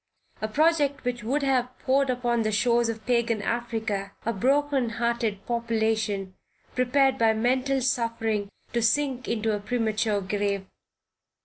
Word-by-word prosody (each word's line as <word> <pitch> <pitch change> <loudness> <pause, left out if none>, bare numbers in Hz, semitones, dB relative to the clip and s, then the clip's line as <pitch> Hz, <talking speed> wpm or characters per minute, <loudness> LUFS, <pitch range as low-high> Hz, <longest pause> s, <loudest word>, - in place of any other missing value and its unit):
A 215 - 0
project 290 +3 +2
which 245 -2 -2
would 275 +6 0
have 255 -2 0
poured 275 +1 +1
upon 240 -2 +1
the 215 -1 0
shores 235 +2 +2
of 220 -1 -5
Pagan 235 -2 +1
Africa, 220 -4 -2
a 230 - 0
broken 270 +3 +1
hearted 235 -4 -1
population, 220 -4 -1 0.4
prepared 265 +1 +2
by 225 -1 +4
mental 255 +4 +1
suffering 230 -5 0 0.2
to 235 - +1
sink 255 +2 +1
into 220 -1 0
a - - -3
premature 215 -1 0
grave. 200 0 -1
235 Hz, 135 wpm, -26 LUFS, 215-255 Hz, 0.4 s, by